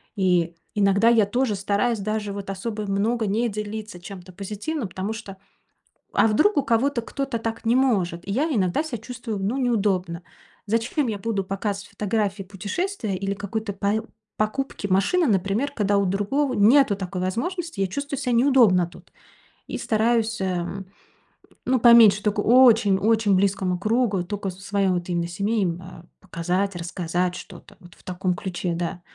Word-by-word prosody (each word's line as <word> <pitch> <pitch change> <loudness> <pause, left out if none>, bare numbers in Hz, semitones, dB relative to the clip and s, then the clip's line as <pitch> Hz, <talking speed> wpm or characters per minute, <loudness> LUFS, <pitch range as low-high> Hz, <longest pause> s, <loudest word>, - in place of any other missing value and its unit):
И 180 -4 +1 0.2
иногда 200 +2 +4
я 225 -3 +5
тоже 230 +1 0
стараюсь 205 +4 0
даже 210 0 -2
вот 200 -1 -6
особо 210 +2 -4
много 220 +3 0
не 225 +4 0
делиться 210 -2 -6
чем-то 185 0 -10
позитивным, 210 - -4
потому 190 +3 -4
что, 205 -4 -9 0.8
а - - +4
вдруг 305 - +3
у 285 - +3
кого-то 245 +1 +1
кто-то 270 +1 -3
так 225 0 -5
не 230 +2 +3
может. 195 -10 +1
И 200 - -2
я 295 +9 0
иногда 190 - +1
ся 270 -7 -5
чувствую, 230 -1 -6
ну, 205 +7 -1
неудобно. 195 -8 0 0.4
Зачем 230 +6 0
я 210 -2 -2
буду 205 -2 -2
показывать 200 +1 -4
фотографии 205 -1 -2
путешествия 205 - -3
или 195 +1 -2
какой-то 210 +1 -4
пое 200 +3 -1 0.3
покупки 215 0 -2
машины, 200 - +2
например, 205 +7 0
когда 205 -5 +1
у 200 - +1
другого 210 +9 0
нету 230 +1 +5
такой 185 -1 -5
возможности? 320 - -3
Я 195 - +2
чувствую 280 +6 -4
ся 255 -3 -1
неудобно 235 -8 +4
тут 175 - -17 0.6
и - - -4
стараюсь, 225 0 +1
эм, 185 +1 -3 0.8
ну, 260 0 +3
поменьше, 225 -4 +7
только 210 0 0
очень-очень 220 -3 +4
близкому 190 -2 +1
кругу, 215 -2 +1
тока 200 +1 -4
своя 195 +1 -1
вот 175 0 -2
именно, 170 -1 -1
э, - - -8
семей 200 +5 -1
именно 175 -1 -5
показать, 185 +2 -2
рассказать. 175 +1 -2
Что-то 175 - -12
вот 175 -1 -16
в - - -23
таком 185 0 -2
ключе, 180 -2 -3
да. 175 +1 -3
205 Hz, 160 wpm, -24 LUFS, 190-230 Hz, 0.8 s, поменьше